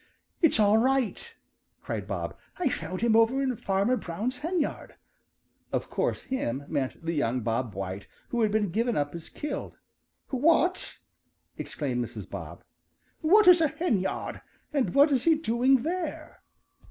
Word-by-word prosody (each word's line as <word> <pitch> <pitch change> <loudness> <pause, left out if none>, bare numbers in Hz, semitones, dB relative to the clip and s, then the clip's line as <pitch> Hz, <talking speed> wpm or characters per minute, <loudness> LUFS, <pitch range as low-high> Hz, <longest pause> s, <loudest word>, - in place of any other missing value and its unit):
"It's 325 -9 +4
all 210 +1 +5
right!" 270 - 0 0.5
cried - - -4
Bob. - - -4 0.2
"I 355 -6 +1
found 180 -2 -4
him 230 -1 +3
over 230 +4 +4
in 265 -2 0
Fanner 200 +5 +1
Brown's 220 +9 -4
henyard." 330 0 -2 0.8
Of - - -2
course - - -1
"him" 140 - -3
meant 140 +3 -3
the 165 - -1
young 125 -5 0
Bob 115 -1 -2
White 95 +1 -5 0.2
who 240 - 0
had 215 -2 +3
been 210 -4 +1
given 230 +4 0
up 145 0 -1
as 170 -1 -8
killed. 295 -1 -5 0.5
"What?" 330 +7 +2 0.6
exclaimed 125 -5 -3
Mrs. 120 - -7
Bob. - - -8 0.6
"What 385 +5 +5
is 350 -2 +8
a 320 - +5
henyard, 235 - -2 0.3
and 275 -3 0
what 285 +2 +6
is 260 -3 +1
he 330 -1 +6
doing 255 -3 +2
there?" 345 +2 -4
235 Hz, 150 wpm, -28 LUFS, -, 0.8 s, is